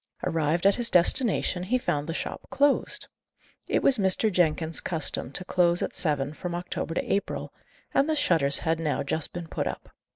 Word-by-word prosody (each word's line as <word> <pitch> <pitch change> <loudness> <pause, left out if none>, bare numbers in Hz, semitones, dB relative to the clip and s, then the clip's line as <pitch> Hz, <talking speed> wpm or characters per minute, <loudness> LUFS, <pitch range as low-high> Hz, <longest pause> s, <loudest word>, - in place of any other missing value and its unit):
Arrived 165 0 0
at 200 - +6
his 240 +1 +1
destination, 180 +1 +3
he 215 +8 0
found 150 - -2
the - - -2
shop - - -5
closed. 280 +1 +1 0.6
It - - 0
was 260 -4 +3
Mrs. 195 +3 +3
Jenkins's 160 -2 0
custom 160 -5 -1
to 185 - -2
close 175 -1 +2
at - - -4
seven 145 -3 0
from 175 +1 -5
October 175 -1 -4
to - - -1
April; 200 - -3 0.4
and 275 +3 +2
the 315 - +1
shutters 160 - +2
had 160 0 -1
now 155 -2 -1
just 150 +2 -1
been 175 -1 -7
put - - -3
up. - - -7
175 Hz, 185 wpm, -26 LUFS, 160-200 Hz, 0.6 s, at